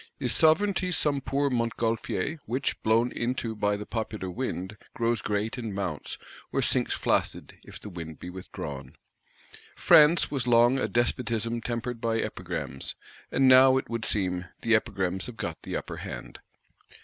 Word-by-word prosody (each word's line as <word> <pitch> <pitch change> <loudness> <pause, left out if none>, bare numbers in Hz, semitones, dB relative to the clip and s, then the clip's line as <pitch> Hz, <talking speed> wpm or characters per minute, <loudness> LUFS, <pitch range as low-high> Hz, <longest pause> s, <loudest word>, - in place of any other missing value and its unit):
Is - - +2
Sovereignty 180 +3 +3
some 145 -5 +1
poor 140 +1 0
Montgolfier; 115 - -1
which, 130 +4 -2
blown 115 +3 +2
into 120 -2 -2
by 105 -1 0
the 105 - -7
popular 110 -5 -4
wind, 105 -3 -4 0.2
grows 115 -3 0
great 105 +5 -2
and 110 -5 -5
mounts; 90 -7 -4 0.3
or - - 0
sinks - - +2
flaccid, - - -1
if - - -11
the - - -10
wind 85 -4 -8
be 90 - -8
withdrawn? 70 -7 -8 0.8
France 150 +2 +6
was 130 -4 -1
long 120 +2 +5
a - - 0
"Despotism 115 -1 0
tempered 120 0 -4
by 115 -1 0
Epigrams;" 70 - -4 0.4
and 135 - +3
now, 130 +1 +7
it 130 - -4
would 115 -1 -2
seem, 90 -4 0 0.2
the 115 - +2
Epigrams 95 -4 0
have 120 -2 -9
get 85 -6 -5
the - - -4
upper - - -6
hand. - - -8
115 Hz, 155 wpm, -27 LUFS, 100-130 Hz, 0.8 s, now